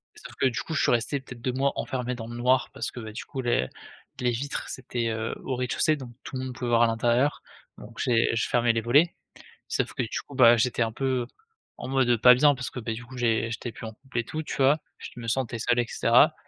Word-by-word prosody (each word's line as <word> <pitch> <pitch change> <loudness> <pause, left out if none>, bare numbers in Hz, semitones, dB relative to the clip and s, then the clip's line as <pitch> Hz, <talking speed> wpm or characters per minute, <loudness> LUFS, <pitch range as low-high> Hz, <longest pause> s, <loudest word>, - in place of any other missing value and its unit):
Sauf - - -12
que, - - +4
du 120 - -2
coup, 160 - -6
je 155 - +1
suis - - +3
resté 125 +4 +1
peut-être 125 -2 -11
2 130 +1 -1
mois 135 +2 +1
enfermé 125 -1 -3
dans 115 -2 -7
le 120 - -7
noir 125 +2 +2
parce 115 - -3
que, - - -9
beh, 110 -2 -8
du - - -6
coup, 135 - -5
les 120 - +1 0.5
les 125 -1 +1
vitres 135 +5 -4
c'était, 120 -2 -3
heu, 110 0 -3
au 130 - -2
rez-de-chaussée 125 +5 +1
donc 130 -4 -9
tout - - -8
le 130 - -3
monde 130 -1 -6
pouvait 125 -2 -3
voir 115 0 +4
à 120 - +6
l'intérieur 120 +5 +1 0.3
donc 115 +2 -12
j'ai 115 -2 +2
je 115 - 0
fermais 120 -1 +3
les 115 - 0
volets. 145 +9 +3 0.5
Sauf - - -1
que, - - -2
du 110 - -3
coup, - - -12
bah, 120 -2 +7
j'étais 120 +1 0
un 115 - -2
peu, 130 -1 -1 0.5
en - - -6
mode, 135 -2 +2
heu, 120 - +4
pas 125 +3 +8
bien 145 +2 +5
parce 130 0 -5
que, - - -6
beh, 115 -1 -3
du 120 +1 -9
coup, 130 +2 -12
j'ai 115 -1 +1
j'étais 115 +1 -5
plus 115 - -9
en 110 - -7
couple 130 +2 -10
et 115 - -2
tout, 155 - -4
tu - - -5
vois, 140 +3 +4 0.2
je - - -8
me 115 - -7
sentais 120 0 -1
seul 120 +2 +1
et 120 - +2
cetera. 125 +7 +4
120 Hz, 265 wpm, -26 LUFS, 115-130 Hz, 0.5 s, pas